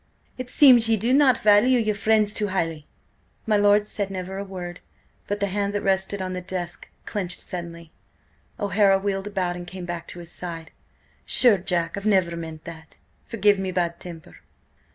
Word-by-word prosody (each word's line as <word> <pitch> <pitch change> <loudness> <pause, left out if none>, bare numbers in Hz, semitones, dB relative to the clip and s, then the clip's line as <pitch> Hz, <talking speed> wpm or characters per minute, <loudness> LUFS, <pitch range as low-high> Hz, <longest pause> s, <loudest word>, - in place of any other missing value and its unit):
"It 255 -1 -7
seems 250 -5 +6
ye 225 - +3
do 235 +5 0
not 270 -3 +5
value 215 +5 +4
your 215 -2 0
friends 210 0 +1
too 210 - -2
highly!" 165 -5 -3 0.6
My 215 - +2
lord 205 0 +4
said 205 -2 -3
never 190 0 -5
a - - -3
word. 180 -3 -8 0.5
But 205 0 -2
the 200 - +1
hand 200 +1 -2
that 205 - -2
rested 190 0 +1
on 185 0 -4
the 180 - -4
desk 180 -1 -6 0.2
clenched 185 -4 -4
suddenly. 170 -2 -8 0.7
O'Hara 200 -1 +3
wheeled 195 0 -3
about 185 -4 -2
and 175 0 -8
came 185 -1 -7
back 170 -1 -6
to - - -10
his 170 -1 -9
side. 165 -2 -7 0.5
"Sure, 230 -6 +5
Jack, 175 -2 -2
I 200 - -5
never 185 -4 +2
meant 160 -2 -8
that! 160 -1 -12 0.3
Forgive 205 -2 +2
me 190 -1 -3
bad 170 -2 -2
temper!" 170 -3 -11
190 Hz, 180 wpm, -24 LUFS, 175-205 Hz, 0.7 s, seems